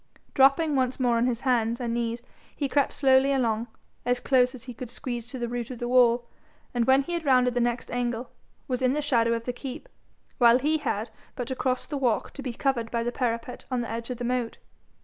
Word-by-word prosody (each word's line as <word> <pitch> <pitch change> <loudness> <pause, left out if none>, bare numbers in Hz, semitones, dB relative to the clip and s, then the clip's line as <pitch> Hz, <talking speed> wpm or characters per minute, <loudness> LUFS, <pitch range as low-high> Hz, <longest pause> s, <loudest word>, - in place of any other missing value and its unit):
Dropping 275 +3 +4
once 260 -1 0
more 245 -2 +2
on 235 +2 +2
his 240 -1 -1
hands 235 -3 +1
and 235 -2 -2
knees 235 0 -2 0.3
he 285 - -1
crept 280 +1 +2
slowly 270 0 +4
along, 235 -4 0 0.4
as 245 0 +1
close 250 0 +3
as 240 - -11
he 255 -1 -8
could 245 0 -8
squeeze 240 -1 -5
to 260 - -6
the 240 -1 -2
root 240 -1 -4
of 255 - -6
the 240 - -3
wall, 240 -1 +4 0.5
and 240 -1 +1
when 265 +2 +5
he 345 +4 -2
rounded 255 -5 +3
the 245 - 0
next 240 0 -1
angle, 245 0 -2 0.4
was 255 -1 -2
in 255 0 +3
the 300 - 0
shadow 230 -5 +2
of 230 - -4
the 245 - -2
keep, 265 - -7 0.5
while 240 -1 +7
he 305 +4 +1
had 220 -4 -2 0.2
but 245 - -4
to 260 - -2
cross 255 0 -1
the 290 - -4
walk 245 -5 0
to 280 - -8
be 260 -2 -3
covered 235 -2 -1
by 235 0 -1
the 240 - -1
parapet 240 -1 -3
on 250 -2 0
the 235 - -5
edge 230 +1 -5
of 250 - -4
the 245 - -5
moat. 245 -1 -1
245 Hz, 230 wpm, -26 LUFS, 235-260 Hz, 0.5 s, while